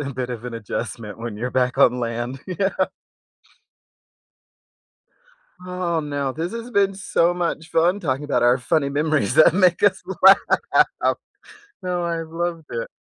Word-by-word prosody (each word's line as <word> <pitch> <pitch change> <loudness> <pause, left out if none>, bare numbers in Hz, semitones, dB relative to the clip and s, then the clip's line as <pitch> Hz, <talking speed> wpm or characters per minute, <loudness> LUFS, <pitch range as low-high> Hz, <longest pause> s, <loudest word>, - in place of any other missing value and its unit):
a 140 -1 -4
bit 125 0 -4
of 120 -1 -6
an 125 -1 -6
adjustment 110 -1 -6
when 115 -2 -6
you're 125 +4 -3
back 125 +1 0
on 125 -2 +4
land. 120 +2 -4
Yeah. 190 +1 -1 2.9
Aw, 180 -2 -2
now, 145 -3 -3
this 165 +5 -4
has 230 +1 -6
been 200 -2 +2
so 175 -3 +1
much 170 -2 -3
fun 175 +5 +2
talking 140 -4 -2
about 130 -5 0
our 120 +2 +4
funny 140 +3 0
memories 145 -5 0
that 155 +1 +6
make 180 -2 +3
us 205 -1 +3 0.2
laugh. 195 +1 +4 0.7
No, 180 -1 -2
I've 165 -1 -3
loved 165 -1 -4
it. 115 -1 -4
155 Hz, 145 wpm, -22 LUFS, 125-175 Hz, 2.9 s, that